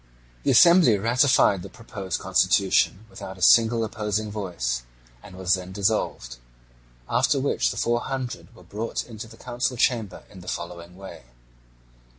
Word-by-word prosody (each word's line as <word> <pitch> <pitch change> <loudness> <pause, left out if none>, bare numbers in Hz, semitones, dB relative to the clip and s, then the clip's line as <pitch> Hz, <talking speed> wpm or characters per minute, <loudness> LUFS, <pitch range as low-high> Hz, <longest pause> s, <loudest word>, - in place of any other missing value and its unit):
The - - -1
assembly 165 - +6
ratified 115 -2 +3
the 100 - -9
proposed 105 -5 -6
constitution, 105 +3 +2
without 95 -1 -9
a - - -14
single 115 +2 +5
opposing 105 -1 -3
voice, 85 - -3 0.4
and 95 - -13
was 95 0 0
then 95 -1 -3
dissolved; 100 - -2 0.7
after 135 +4 +1
which 140 - 0
the - - -6
Four 120 0 +1
Hundred 130 -1 -5
were - - -16
brought 110 +3 -4
into 115 -1 -9
the - - -15
council 125 0 -3
chamber 115 -4 0
in 95 - -12
the 90 - -14
following 85 0 -6
way. 90 -7 -11
105 Hz, 150 wpm, -24 LUFS, 95-120 Hz, 0.7 s, assembly